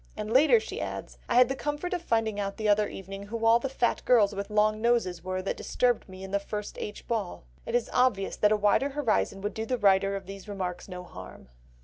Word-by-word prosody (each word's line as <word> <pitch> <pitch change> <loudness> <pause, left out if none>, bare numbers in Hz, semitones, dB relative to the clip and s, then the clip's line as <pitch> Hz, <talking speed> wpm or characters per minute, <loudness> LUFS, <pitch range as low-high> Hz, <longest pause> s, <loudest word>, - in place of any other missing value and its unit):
And 215 +1 -3
later 310 - +6
she - - -6
adds: - - -6
"I - - +1
had 250 0 +7
the 270 - -2
comfort 295 +6 -3
of 355 - -2
finding 225 -8 0
out 200 -1 -3
the 215 -1 -1
other 210 0 +3
evening 195 +1 -8
who 225 +1 -3
all 230 +1 +6
the 270 - -3
fat 245 -2 0
girls 215 -5 +4
with 200 +1 -5
long 215 0 +2
noses 225 -8 +1
were 185 0 -3
that 195 - -2
disturbed 245 -5 0
me 190 0 -10
at 190 - -8
the 200 - +1
1st 210 +1 -5
H. 205 - -7
ball." 215 - -3 0.2
It 235 - -1
is 245 - +1
obvious 250 -6 +2
that 210 - +3
a 215 - +4
wider 210 +7 +2
horizon 245 -8 0
would 205 0 -3
do 220 0 -4
the 255 - 0
writer 195 -2 +3
of 195 -1 -6
these 195 +1 -9
remarks 185 -3 -4
no 180 -1 -7
harm. 95 - -11
210 Hz, 240 wpm, -28 LUFS, 195-235 Hz, 0.2 s, had